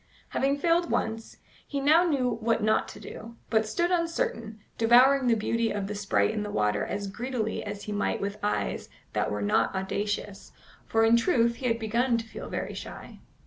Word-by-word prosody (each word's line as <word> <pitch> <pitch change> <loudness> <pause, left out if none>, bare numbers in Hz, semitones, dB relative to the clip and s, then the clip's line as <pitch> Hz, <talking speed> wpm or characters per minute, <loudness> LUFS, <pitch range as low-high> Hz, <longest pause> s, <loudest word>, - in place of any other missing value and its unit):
Having 275 +1 +1
failed 335 +3 +2
once, 225 0 -2 0.3
he 285 - -2
now 310 +5 +5
knew 255 -9 0
not 230 +1 +1
what 215 0 +2
to - - -10
do, 230 +1 -9 0.2
but 220 -1 +2
stood 345 +11 0
uncertain, 335 - -1 0.2
devouring 250 +4 +5
the 235 - +4
beauty 230 +1 0
of 205 -1 -2
the 205 - -4
sprite 205 +1 +1
in 215 -1 -2
the 210 - -4
water 105 - 0
as 200 0 -3
greedily 220 +2 -3
as 205 -1 -6
he 210 - -6
might 205 0 -1
with 200 +1 -4
eyes 210 - -2 0.2
that - - 0
were 105 0 -2
not 110 - +1
audacious, 200 +1 -3 0.3
for 225 0 +3
in 225 +1 +5
truth 235 -3 +2
he 255 - -2
had 230 -1 +1
begun 235 +2 +1
to 230 - -4
feel 225 - -8
very - - -4
shy. - - -9
225 Hz, 190 wpm, -27 LUFS, 205-260 Hz, 0.3 s, now